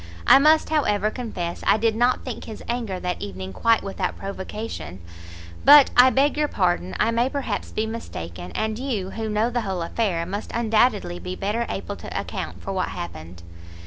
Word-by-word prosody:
I - - +8
must, 310 +2 +4
however, 215 -9 +1
confess 180 -9 -5
I - - +5
did 225 0 +1
not 245 +2 +1
think 250 -4 -6
his 220 - -9
anger 230 -6 -2
that 180 0 -3
evening 95 -1 -6
quite 230 - +2
without 195 - -3
provocation, 190 - -6 0.6
but 285 0 +8
I 250 +1 +8
beg 275 +3 +2
your 300 0 +2
pardon, 175 - 0
I 230 - +3
may 235 +3 +1
perhaps 270 -7 -3
be 215 - -1
mistaken, 90 - -7
and 220 +1 -2
you, 220 -8 -3
who 220 -1 -4
know 215 +3 +1
the 240 0 0
whole 190 -5 -3
affair, 170 -2 -1
must 200 +4 -5
undoubtedly 215 -5 +1
be 180 0 -5
better 215 +5 -2
able - - -4
to - - -5
account - - -6
for 195 - -4
what 185 - 0
happened." 85 0 -8
215 Hz, 180 wpm, -23 LUFS, 180-235 Hz, 0.6 s, I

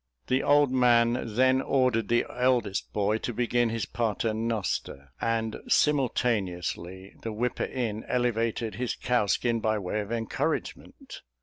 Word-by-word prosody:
The 130 +1 +1
old 145 -2 +4
man 120 -3 +3
then 130 +1 +4
ordered 125 -6 +1
the 120 0 +2
eldest 125 -5 0
boy 105 +1 0
to 120 - -3
begin 120 0 +1
his 115 -3 -2
Pater 115 0 -1
Noster; 110 - -3
and 115 -1 -1
simultaneously 95 - 0
the 115 - -4
whipper 120 +3 -1
in 110 -4 -3
elevated 115 -2 -1
his 125 - -1
cowskin 120 0 +1
by 110 0 0
way 100 +1 -2
of 105 +1 -7
encouragement. 115 -2 -4
115 Hz, 130 wpm, -27 LUFS, 110-125 Hz, -, old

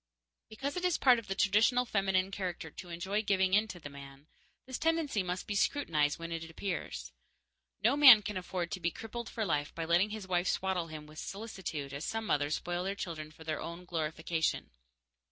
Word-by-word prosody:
Because 270 +6 -4
it 360 - -3
is 360 -2 +2
part 250 -3 +5
of 230 - -11
the 195 - -2
traditional 215 +6 +4
feminine 195 -3 +1
character 180 -5 -4
to 180 - -10
enjoy 190 +5 -1
giving 190 -3 +2
in 210 +2 +4
to 185 -5 -8
the 150 - -8
man, 140 0 -11 0.4
this 260 -1 -5
tendency 320 -9 +1
must 180 0 -3
be 210 - -3
scrutinized 160 - +1
when 165 0 -6
it 165 0 -4
appears. 185 +4 -4 0.7
No - - +4
man 265 -8 +10
can 210 0 -4
afford 180 -1 -3
to 195 - -3
be 170 -1 +1
crippled 225 +5 -7
for 220 - -2
life 145 -5 -1
by 165 - -3
letting 175 +5 +3
his 210 -2 -6
wife 180 -1 +1
swaddle 185 -3 0
him 155 -1 -8
with 155 0 -11
solicitude 190 -9 -5
as 140 +2 -5
some 225 +3 -2
mothers 145 -4 +1
spoil 175 +1 -3
their 195 +1 -1
children 165 -7 -5
for 155 +1 -14
their 155 -1 -3
own 170 +2 -7
glorification. 160 - -1
185 Hz, 200 wpm, -32 LUFS, 165-215 Hz, 0.7 s, man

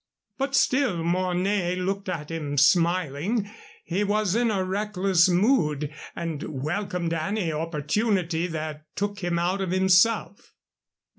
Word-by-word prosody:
But 275 +1 0
still 255 -13 +2
Mornay 180 +1 0
looked 195 +1 -3
at 160 -4 -4
him, 150 -3 -4
smiling. 175 - +2 0.3
He 185 +4 -1
was 205 -2 +1
in 235 +1 +2
a 195 -3 0
reckless 190 -2 +2
mood, 160 - +2 0.2
and 165 -4 -4 0.2
welcomed 175 0 -2
any 165 +1 -1
opportunity 165 +3 -1
that 155 -2 -5
took 205 0 -2
him 175 -2 -1
out 180 +3 0
of 190 - -2
himself. 190 +1 +2
180 Hz, 125 wpm, -25 LUFS, 165-200 Hz, 0.3 s, still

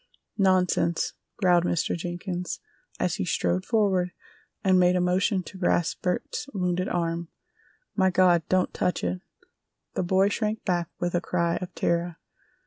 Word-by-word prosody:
"Nonsense!" 185 -3 +2 0.2
growled 180 -3 +4
Mr. 175 -2 0
Jenkins, 175 +1 -4 0.4
as - - 0
he - - -1
strode 90 +1 0
forward 190 -5 +2 0.5
and 185 -1 +4
made 180 0 +4
a - - +2
motion 185 +2 +1
to 190 - -11
grasp 175 -2 +1
Bert's 280 +10 -2
wounded 180 0 0
arm. 170 -1 -1 0.7
"My 190 -2 +4
God, 180 -2 +4
don't 185 -1 +2
touch 180 - -1
it!" 90 0 -2 0.7
The - - -1
boy 190 +2 +3
shrank 215 +1 -2
back 175 -3 0
with 175 0 -1
a 175 - +1
cry 170 -2 0
of 180 -1 -7
terror. 170 0 0
180 Hz, 145 wpm, -26 LUFS, 175-190 Hz, 0.7 s, growled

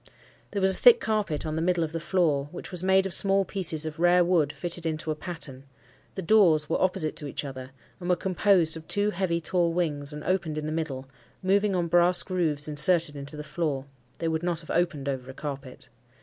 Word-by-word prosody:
There 200 -2 -3
was 190 0 +4
a - - -9
thick 480 -1 +7
carpet 210 - -2
on 155 0 -3
the 160 - -1
middle 175 0 +1
of 155 - -4
the 165 - -3
floor, 155 -5 0
which 180 - -8
was 180 -2 -2
made 190 +1 +3
of 190 - -2
small 195 -1 +4
pieces 165 -6 0
of 155 0 -6
rare 175 0 +4
wood 165 -5 +2
fitted 175 +1 -5
into 160 -1 -3
a - - -2
pattern; 150 -6 -7 0.5
the 190 - -4
doors 165 -6 +4
were - - -1
opposite 185 -4 +1
to 150 - 0
each 140 - -5
other, 130 -2 -8 0.3
and 175 -1 -5
were 180 - +4
composed 185 -3 +2
of 160 0 -10
two 205 0 +1
heavy 185 -4 -1
tall 170 0 0
wings, 150 -5 -2
and 150 0 -8
opened 175 -5 -1
in 155 - -3
the 155 - -3
middle, 145 -5 -4 0.4
moving 200 +1 +2
on 175 -1 0
brass 175 +1 +5
grooves 160 -6 -1
inserted 155 +1 +2
into 140 +1 -8
the 150 - -6
floor—they 140 -3 -5
would 160 -1 -1
not 175 -2 -2
have 160 - -9
opened 165 -5 -1
over 130 -2 -4
a 130 - -9
carpet. 140 -3 -8
165 Hz, 220 wpm, -26 LUFS, 150-185 Hz, 0.5 s, thick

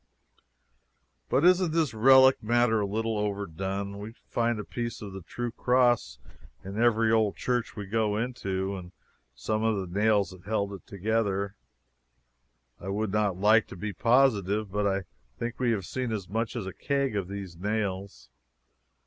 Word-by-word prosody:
But 145 - +3
isn't 180 -2 +4
this 160 -7 +1
relic 130 +3 +6
matter 120 0 +2
a 100 - 0
little 110 +1 -1
overdone? 100 0 -3
We 105 +2 -7
find 120 -1 0
a - - -3
piece 120 +2 -4
of 100 -2 -8
the 95 - -7
true 120 +8 -5
cross 120 - +2 0.5
in 100 +4 -4
every 115 -1 +3
old 110 -2 +2
church 120 -2 -2
we 105 -3 -5
go 105 +1 0
into, 100 -5 -2
and 90 -1 -9 0.4
some 110 - -2
of 110 -1 +2
the 95 0 -3
nails 105 -2 +3
that 95 -1 -13
held 100 -1 -1
it 95 - -10
together. 100 0 -1 1.2
I 95 - -9
would 105 +1 -1
not 105 -3 +1
like 105 +3 +4
to - - -10
be 105 +3 -4
positive, 110 -4 +2
but 105 +1 0
I 95 0 0 0.3
think 120 0 -4
we 125 -2 +1
have 105 -6 0
seen 125 +2 -3
as 100 -4 -3
much 115 +4 -2
as 115 -5 -3
a 95 - -6
keg 140 -5 -1
of 100 -3 -1
these 100 -3 -7
nails. 100 - -3
105 Hz, 165 wpm, -28 LUFS, 100-115 Hz, 1.2 s, relic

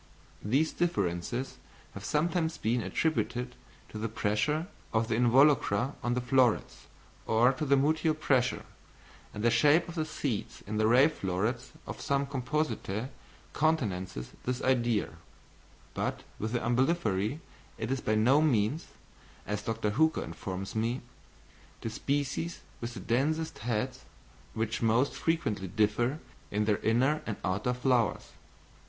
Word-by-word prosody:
These 135 +9 +2
differences 115 - -1 0.4
have 100 - -8
sometimes 160 - 0
been 115 +3 0
attributed 125 -3 -1 0.4
to 110 - -7
the 115 +1 -2
pressure 115 +10 0 0.3
of 110 +1 +1
the 110 - +2
involucra 125 -1 +4
on 120 0 0
the 125 - 0
florets, 125 -1 +1 0.4
or 120 +4 +4
to 145 +4 -3
their 140 +1 +5
mutual 155 +3 +2
pressure, 130 -5 +1 0.7
and 105 - -6
the 120 - +4
shape 145 +8 +4
of 170 - -7
the 160 -2 -1
seeds 140 -8 -4
in 105 +1 -3
the 110 0 +3
ray 125 +5 +6
florets 120 - -2
of - - -7
some 140 0 +1
Compositæ 135 -5 -2 0.4
countenances 100 - -1
this 125 0 -1
idea; 120 -4 +2 0.8
but - - -2 0.2
with 110 +2 -3
the 120 - +1
Umbelliferæ 120 - +1 0.4
it - - -3
is 135 -1 -1
by 110 - +1
no 125 +7 +5
means, 140 +1 +1 0.6
as 105 0 -2
Dr. 110 -1 -1
Hooker 160 +8 +2
informs 95 0 -5
me, 115 +3 0 0.8
the 115 - -3
species 145 +7 -2 0.2
with 120 +1 -5
the - - -5
densest 155 - 0
heads 125 +3 -2 0.5
which 110 0 -1
most 115 +4 +3
frequently 110 - -1
differ 110 +7 +1 0.3
in 105 +1 0
their 105 -1 +2
inner 130 +7 +2
and 110 - -3
outer 100 +6 0
flowers. 125 -6 +1
120 Hz, 135 wpm, -30 LUFS, 110-140 Hz, 0.8 s, ray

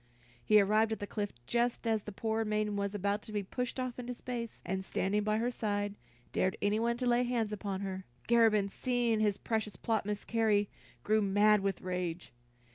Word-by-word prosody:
He 215 0 +6
arrived 215 +2 +3
at 220 - -2
the 205 - -3
cliff 205 0 -3
just 240 - 0
as 220 -2 +2
the 210 - -7
poor 220 +2 -1
maiden 210 -1 0
was 200 0 -2
about 205 +1 0
to 215 - -11
be 205 -1 -1
pushed 250 +6 -3
off 255 -1 -3
into 245 0 -4
space, 235 -2 -5
and 190 +2 -2
standing 195 +2 0
by 215 +1 +1
her 235 +2 0
side, 205 -3 -1 0.4
dared 185 0 +1
anyone 225 +3 +1
to 250 - -2
lay 240 0 +4
hands 240 -3 0
upon 200 -2 -3
her. 190 -1 -4 0.2
Garabin, 225 -4 +4
seeing 240 +1 0
his 210 -2 +2
precious 220 -4 -2
plot 220 +2 -1
miscarry, 210 0 +1 0.3
grew 215 +1 +3
mad 205 +1 +4
with 195 -1 -2
rage. 180 -4 -3
215 Hz, 190 wpm, -32 LUFS, 200-230 Hz, 0.4 s, He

